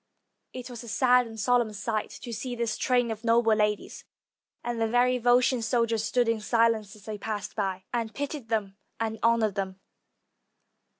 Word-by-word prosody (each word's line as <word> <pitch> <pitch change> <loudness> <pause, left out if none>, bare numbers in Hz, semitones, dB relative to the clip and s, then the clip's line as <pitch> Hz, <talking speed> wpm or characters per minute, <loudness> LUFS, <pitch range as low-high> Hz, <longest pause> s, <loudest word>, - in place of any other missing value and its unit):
It 255 -1 -7
was 240 -1 -8
a - - -10
sad 250 +2 +3
and 225 -1 -9
solemn 240 0 +2
sight 215 +1 -2
to 235 - -6
see 245 +3 -4
this 230 -2 -1
train 245 -2 +1
of 220 0 -6
noble 230 -1 +4
ladies, 210 -1 -1 0.6
and 240 -1 -3
the 225 - +3
very 250 +2 +3
Volscian 245 +1 +3
soldiers 230 -1 +1
stood 245 +2 +1
in 230 -1 0
silence 225 -2 +1
as 210 - -17
they 215 -1 -5
passed 210 -3 -4
by, 190 -3 -2
and 230 -2 -1
pitied 285 -3 -5
them 205 -4 -1 0.2
and 220 -1 -2
honored 230 -3 +3
them. 190 -1 -4
230 Hz, 175 wpm, -27 LUFS, 215-245 Hz, 0.6 s, noble